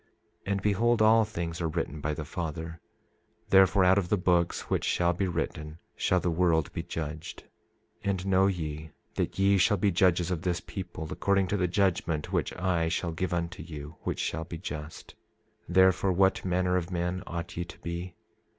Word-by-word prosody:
27:26 -, -, 0 dB
And 100 Hz, -1 st, 0 dB
behold, 110 Hz, +3 st, +2 dB
all 110 Hz, +1 st, +6 dB
things 85 Hz, -5 st, -4 dB
are 85 Hz, -, 0 dB
written 80 Hz, -2 st, -3 dB
by 75 Hz, +1 st, -1 dB
the 75 Hz, -, -5 dB
Father; 80 Hz, 0 st, -5 dB, 0.7 s
therefore 95 Hz, 0 st, +6 dB
out 95 Hz, +2 st, +5 dB
of 90 Hz, -3 st, -3 dB
the 105 Hz, -, +3 dB
books 90 Hz, -2 st, +1 dB
which -, -, -1 dB
shall 85 Hz, 0 st, +2 dB
be 95 Hz, +3 st, -1 dB
written 80 Hz, -2 st, -4 dB, 0.2 s
shall -, -, +2 dB
the 90 Hz, -, -1 dB
world 80 Hz, -3 st, +1 dB
be -, -, -2 dB
judged. 80 Hz, +1 st, -6 dB, 0.6 s
27:27 100 Hz, -, -1 dB
And 95 Hz, -2 st, -1 dB
know 95 Hz, 0 st, +4 dB
ye 80 Hz, -4 st, -3 dB, 0.2 s
that -, -, -2 dB
ye 100 Hz, 0 st, +4 dB
shall 105 Hz, +3 st, +4 dB
be 100 Hz, +2 st, +2 dB
judges 90 Hz, 0 st, +2 dB
of 85 Hz, -3 st, -1 dB
this 90 Hz, -1 st, -1 dB
people, 85 Hz, -5 st, -7 dB
according 100 Hz, -1 st, +2 dB
to 105 Hz, -, +1 dB
the 90 Hz, -1 st, +1 dB
judgment 85 Hz, -5 st, 0 dB
which -, -, 0 dB
I 90 Hz, -2 st, 0 dB
shall 85 Hz, 0 st, -1 dB
give 90 Hz, +3 st, -2 dB
unto 85 Hz, -2 st, -2 dB
you, 75 Hz, -1 st, -8 dB
which -, -, -3 dB
shall 80 Hz, +1 st, -2 dB
be 85 Hz, +1 st, -7 dB
just. 75 Hz, -2 st, -7 dB, 0.6 s
Therefore, 95 Hz, +1 st, +4 dB
what 95 Hz, +2 st, +3 dB
manner 90 Hz, 0 st, +1 dB
of 90 Hz, -1 st, -3 dB
men 90 Hz, +1 st, -2 dB
ought 85 Hz, 0 st, -5 dB
ye 85 Hz, -, -2 dB
to 85 Hz, -, -11 dB
be? 85 Hz, +1 st, -6 dB
90 Hz, 190 wpm, -28 LUFS, 80-95 Hz, 0.7 s, all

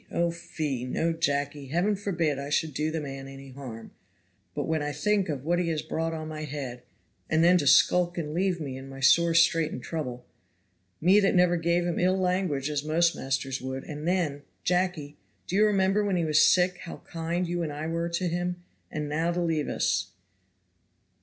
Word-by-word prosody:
oh 170 Hz, 0 st, +1 dB
fie! 155 Hz, -6 st, -4 dB
No, 160 Hz, +6 st, 0 dB
Jacky, 145 Hz, -3 st, -1 dB
Heaven 175 Hz, +9 st, +1 dB
forbid 170 Hz, -8 st, -1 dB
I 140 Hz, +1 st, -5 dB
should 150 Hz, +1 st, 0 dB
do 150 Hz, +3 st, -1 dB
the 160 Hz, 0 st, -2 dB
man 135 Hz, -2 st, -6 dB
any 135 Hz, 0 st, -10 dB
harm; 125 Hz, -4 st, -9 dB, 0.6 s
but -, -, -1 dB
when 160 Hz, -1 st, -1 dB
I 145 Hz, 0 st, -2 dB
think 205 Hz, +2 st, 0 dB
of 140 Hz, -2 st, -4 dB
what 175 Hz, +2 st, +2 dB
he 180 Hz, -, 0 dB
has 155 Hz, -2 st, -1 dB
brought 165 Hz, +1 st, -2 dB
on 155 Hz, -1 st, -5 dB
my 155 Hz, 0 st, -6 dB
head, 135 Hz, -4 st, -6 dB, 0.5 s
and 160 Hz, +1 st, +3 dB
then 175 Hz, +1 st, +6 dB
to 145 Hz, -, -1 dB
skulk 175 Hz, +5 st, +4 dB
and 150 Hz, -3 st, -3 dB
leave 180 Hz, +1 st, 0 dB
me 135 Hz, -4 st, -5 dB
in 135 Hz, +1 st, -9 dB
my 135 Hz, 0 st, -9 dB
sore 170 Hz, +5 st, +4 dB
strait 165 Hz, -1 st, +4 dB
and -, -, -5 dB
trouble, 130 Hz, -7 st, -5 dB, 0.7 s
me 185 Hz, +5 st, +5 dB
that 195 Hz, -2 st, +2 dB
never 180 Hz, -1 st, +4 dB
gave 170 Hz, +1 st, +1 dB
him 175 Hz, -2 st, -1 dB
ill 185 Hz, +1 st, +3 dB
language 180 Hz, -7 st, 0 dB
as 145 Hz, -1 st, -2 dB
most 165 Hz, +2 st, +2 dB
masters 135 Hz, 0 st, -2 dB
would; 130 Hz, +1 st, -5 dB
and 150 Hz, +1 st, -6 dB
then, 170 Hz, -6 st, 0 dB, 0.2 s
Jacky, 180 Hz, -5 st, -1 dB, 0.3 s
do 185 Hz, -, -3 dB
you 210 Hz, -, +5 dB
remember 195 Hz, 0 st, +2 dB
when 200 Hz, -2 st, 0 dB
he 170 Hz, -2 st, +1 dB
was 155 Hz, 0 st, +4 dB
sick 180 Hz, +1 st, +4 dB
how 170 Hz, -, -9 dB
kind 170 Hz, +2 st, -2 dB
you 175 Hz, 0 st, -2 dB
and 160 Hz, -3 st, -2 dB
I 150 Hz, +2 st, -5 dB
were 165 Hz, +1 st, -2 dB
to 170 Hz, +2 st, -1 dB
him 175 Hz, +1 st, -1 dB, 0.3 s
and 150 Hz, -1 st, -4 dB
now 160 Hz, +3 st, 0 dB
to 175 Hz, -, -2 dB
leave 165 Hz, -4 st, 0 dB
us. -, -, 0 dB
165 Hz, 205 wpm, -27 LUFS, 145-175 Hz, 0.7 s, then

